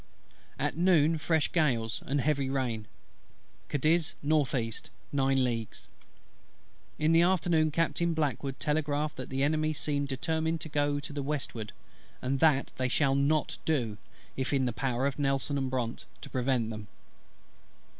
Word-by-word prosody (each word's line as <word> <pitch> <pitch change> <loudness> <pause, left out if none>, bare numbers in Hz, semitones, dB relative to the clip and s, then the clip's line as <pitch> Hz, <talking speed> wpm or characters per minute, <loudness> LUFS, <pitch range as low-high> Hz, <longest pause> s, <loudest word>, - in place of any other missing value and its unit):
At - - -1
noon 165 -2 +4
fresh 160 -1 +1
gales, 120 -9 +1
and 140 +1 +1
heavy 140 -1 +1
rain: 120 -6 -2 0.8
Cadiz 155 +3 +2
N.E. 135 -6 +1 0.4
nine 135 -1 +2
leagues. 115 -3 -3 1.1
In 155 +1 +2
the 165 0 +6
afternoon 170 -3 +3
Captain 165 +2 0
BLACKWOOD 140 -3 -1
telegraphed 150 0 0
that 130 - -6
the 135 +1 0
Enemy 155 +1 +1
seemed 145 -1 -1
determined 160 +4 -1
to 160 - -4
go 145 -1 +1
to 145 +1 -7
the 145 - -3
westward; 135 -6 -3 0.5
and 135 +1 -1
that 145 -3 +3
they 130 0 0
shall 135 +1 +2
not 140 +3 +1
do, 120 -9 0 0.4
if 130 0 -2
in 135 -2 +2
the 125 - -1
power 130 +1 -1
of 140 0 -1
NELSON 135 0 0
AND 135 -1 -1
BRONTE 125 -3 -3 0.2
to - - -8
prevent 125 -3 0
them. 110 -1 -7
140 Hz, 145 wpm, -30 LUFS, 130-155 Hz, 1.1 s, the